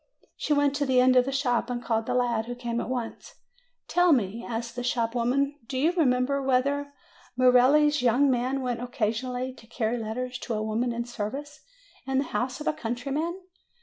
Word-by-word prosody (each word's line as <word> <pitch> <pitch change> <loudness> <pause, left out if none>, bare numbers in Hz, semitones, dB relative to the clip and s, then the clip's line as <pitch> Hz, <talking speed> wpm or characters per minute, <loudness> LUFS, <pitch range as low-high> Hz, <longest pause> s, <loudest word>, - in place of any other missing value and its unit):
She - - -4
went 285 -1 +3
to 285 - 0
the 255 -1 +4
end 255 0 +5
of 250 -1 +5
the 270 - -2
shop 255 -3 0
and 245 -1 -2
called 225 -2 -1
the - - 0
lad, 235 -3 +1
who 245 - -4
came 240 -1 -3
at - - -5
once. 245 -3 -5 0.5
"Tell 355 0 +3
me," 225 -2 0
asked 235 0 -4
the 245 - -3
shop 235 -2 0
woman, 275 +4 0
"do 260 - -4
you 305 +6 +3
remember 280 -4 +1
whether 280 +2 +1 0.5
Merelli's 260 +4 +5
young 250 +3 +4
man 260 +1 0
went 245 -2 -2
occasionally 245 +2 -2
to 225 - -17
carry 235 0 -1
letters 250 +3 -4
to 235 - -3
a 215 - -2
woman 225 +3 -1
in 235 0 -3
service, 255 +6 -5 0.5
in 265 0 0
the 270 - +3
house 255 -1 -3
of 300 - -7
a - - +1
country 245 -2 -4
man?" 325 +5 -1
250 Hz, 200 wpm, -27 LUFS, 235-275 Hz, 0.5 s, end